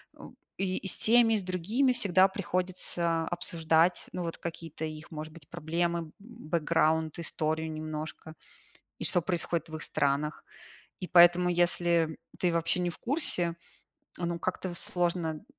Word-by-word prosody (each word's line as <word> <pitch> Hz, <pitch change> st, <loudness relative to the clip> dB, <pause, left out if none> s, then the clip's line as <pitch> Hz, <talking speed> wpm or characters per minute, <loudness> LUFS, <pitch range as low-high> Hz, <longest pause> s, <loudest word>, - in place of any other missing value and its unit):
м, -, -, -13 dB, 0.2 s
и 190 Hz, 0 st, -1 dB
с -, -, +3 dB
теми, 230 Hz, 0 st, +5 dB
и -, -, +3 dB
с 195 Hz, -, -2 dB
другими 205 Hz, +9 st, +1 dB
всегда 190 Hz, -5 st, +4 dB
приходится 180 Hz, -3 st, -1 dB
обсуждать, 165 Hz, 0 st, +1 dB
ну, 180 Hz, -, -3 dB
вот 165 Hz, -, -4 dB
какие-то 165 Hz, -2 st, -6 dB
их, 155 Hz, +2 st, -8 dB
может 155 Hz, 0 st, -7 dB
быть, 160 Hz, -4 st, -15 dB
проблемы, 170 Hz, +2 st, -1 dB
м, 160 Hz, -2 st, -8 dB
бэкграунд, 160 Hz, -7 st, 0 dB
историю 160 Hz, -1 st, -2 dB
немножко, 155 Hz, +1 st, -6 dB, 0.6 s
и -, -, -4 dB
что 175 Hz, -, +2 dB
происходит 170 Hz, -2 st, -1 dB
в 160 Hz, -, -5 dB
их 155 Hz, -, -7 dB
странах. 145 Hz, +2 st, -1 dB, 0.6 s
И 180 Hz, -, -4 dB
поэтому, 175 Hz, 0 st, +6 dB
если, 175 Hz, 0 st, +1 dB
м, 160 Hz, 0 st, -7 dB, 0.2 s
ты 180 Hz, -2 st, +1 dB
вообще 170 Hz, +2 st, 0 dB
не 175 Hz, -1 st, 0 dB
в -, -, -12 dB
курсе, 180 Hz, -, 0 dB, 0.6 s
ну, 170 Hz, -1 st, -2 dB
как-то 185 Hz, 0 st, -3 dB
сложно. 170 Hz, -3 st, -1 dB
170 Hz, 150 wpm, -29 LUFS, 160-180 Hz, 0.6 s, поэтому